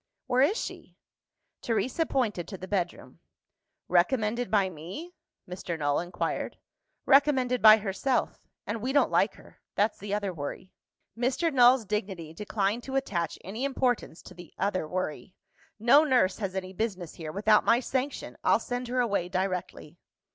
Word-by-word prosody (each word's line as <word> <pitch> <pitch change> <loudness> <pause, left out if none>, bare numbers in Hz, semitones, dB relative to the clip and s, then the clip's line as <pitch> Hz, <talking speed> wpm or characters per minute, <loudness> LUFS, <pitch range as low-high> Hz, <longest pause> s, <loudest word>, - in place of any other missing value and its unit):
"Where 255 0 +2
is 365 - +3
she?" - - -7 0.6
Teresa 255 +7 0
pointed 215 -10 -1
to 195 - -7
the 185 - -8
bedroom. 185 -3 -3 0.7
"Recommended 215 +5 +1
by 200 -2 +3
me?" 185 - -8 0.3
Mr. 180 -2 -5
Null 145 -2 +1
inquired. 175 +1 -3 0.5
"Recommended 265 -3 +4
by 215 0 +9
herself. 220 +5 -2 0.2
And 220 +1 -4
we 260 +3 -2
don't 285 - +3
like - - +2
her. - - -18
That's 210 +2 +1
the 205 0 -7
other 200 -3 -2
worry." 155 +4 -7 0.4
Mr. 260 +7 0
Null's 245 -2 +6
dignity 190 -6 -4
declined 205 +4 -1
to 270 - -5
attach 175 - -1
any 215 +7 -5
importance 255 - -1
to - - -12
the 175 -2 -13
"other 185 -5 -1
worry." 185 +1 -4 0.4
"No 245 +7 +6
nurse 250 -10 +2
has 195 -3 -3
any 185 0 -4
business 190 -5 -3
here, 155 -2 -7
without 210 +4 +3
my 235 - +4
sanction! 265 +2 -3
I'll - - +4
send 245 0 -4
her 250 +1 +1
away 200 -7 0
directly." 180 -3 -3
210 Hz, 155 wpm, -28 LUFS, 185-250 Hz, 0.7 s, by